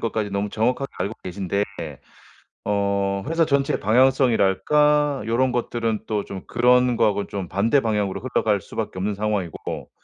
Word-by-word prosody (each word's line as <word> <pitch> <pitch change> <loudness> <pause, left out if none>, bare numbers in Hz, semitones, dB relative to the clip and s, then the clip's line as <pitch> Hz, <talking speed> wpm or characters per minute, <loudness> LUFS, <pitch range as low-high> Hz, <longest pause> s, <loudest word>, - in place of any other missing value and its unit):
것까지 110 -3 -2
너무 100 +1 -1
정확하게 125 +5 0
알고 100 +3 -2
계신데 100 +2 -2 1.0
어 100 -1 0
회사 165 0 +2
전체의 140 -2 +1
방향성이랄까 130 +4 +3
요런 125 +3 +1
것들은 115 -2 -2
또 105 -2 -1
좀 95 -1 -7
그런 125 0 +3
거하고는 105 -3 +1
좀 95 -3 -5
반대 115 - +2
방향으로 105 -4 -1
흘러갈 110 -5 0
수밖에 95 - -5
없는 100 +2 -1
상황이고 100 -4 -3
110 Hz, 345 characters per minute, -23 LUFS, 100-125 Hz, 1.0 s, 방향성이랄까